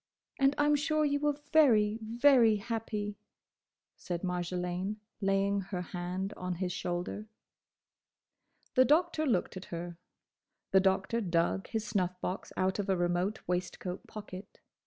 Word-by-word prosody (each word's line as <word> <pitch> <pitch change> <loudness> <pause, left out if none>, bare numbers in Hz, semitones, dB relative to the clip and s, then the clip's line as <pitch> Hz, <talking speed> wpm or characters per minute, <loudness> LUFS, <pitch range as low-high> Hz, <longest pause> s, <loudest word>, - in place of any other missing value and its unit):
"And 275 +1 +4
I 290 - +3
'm 295 0 +4
sure 310 +1 +1
you 285 0 +1
were 295 -1 +1 0.2
very, 225 -8 +5
very 235 0 +5
happy," 210 -1 -3 0.8
said 175 0 -5
Marjolaine, 180 +2 -2 0.3
laying 195 0 +2
her 185 -1 -4
hand 180 +3 -4
on 180 0 -3
his 180 +1 -2
shoulder. 180 +3 -3 1.5
The 255 - +6
Doctor 310 +2 +2
looked 185 -5 0
at 185 - -8
her. 170 0 -6 0.7
The 190 - +6
Doctor 190 +4 +1
dug 175 0 0
his 220 -1 -3
snuff 185 -4 -1
box 185 +1 -4
out 190 +2 +1
of 200 -1 -2
a 190 - +3
remote 175 +4 0
waistcoat 180 +1 -3
pocket. 200 -2 -9
195 Hz, 135 wpm, -31 LUFS, 180-230 Hz, 1.5 s, The